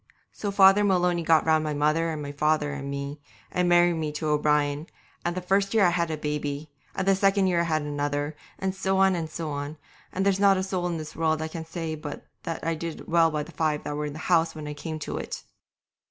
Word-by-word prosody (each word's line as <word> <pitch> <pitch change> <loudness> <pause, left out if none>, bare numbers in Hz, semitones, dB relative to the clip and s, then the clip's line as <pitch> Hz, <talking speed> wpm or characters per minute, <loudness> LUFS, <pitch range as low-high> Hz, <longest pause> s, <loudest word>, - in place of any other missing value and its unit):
So 205 - -4
Father 195 +1 +6
Maloney 180 -3 +2
got 160 -1 +4
round 160 -1 +3
my 150 -1 -2
mother 155 +3 +2
and 155 -2 -4
my 145 - -5
father 150 0 +1
and 140 -1 -5
me, 140 +1 -5 0.3
and 180 0 +1
married 175 0 +5
me 155 -2 -2
to 155 +1 -2
O'Brien, 150 0 +1 0.4
and 175 +1 -2
the 185 - -3
first 195 +3 +1
year 210 -3 +6
I 175 - +4
had 170 -1 0
a 155 - -2
baby, 150 0 -3 0.2
and 190 - -2
the 195 - +6
second 195 0 +3
year 180 -2 +2
I - - +3
had 155 -2 0
another, 145 +1 -2 0.4
so 190 0 -1
on 190 0 +5
and 165 -2 -3
so 160 -1 -4
on, 145 +2 -4 0.3
and 190 +1 -1
there's 195 -1 +2
not 200 -1 +5
a 185 - 0
soul 185 -2 -1
in 170 -1 -2
this 155 -1 -7
world 160 -1 0
can 165 -1 -6
say 165 -1 -4
but 150 -1 -7 0.2
that 165 -1 -4
I 165 - +1
did 165 0 -6
well 165 -1 +4
by 150 -1 -2
the - - -12
five 155 -2 -1
that 145 - -4
were 150 0 -2
in 145 - -6
the - - -8
house 165 -2 +3
when 155 -1 -6
I 150 - -4
came 155 +1 -5
to 155 - -4
it. - - -6
160 Hz, 240 wpm, -26 LUFS, 150-180 Hz, 0.4 s, Father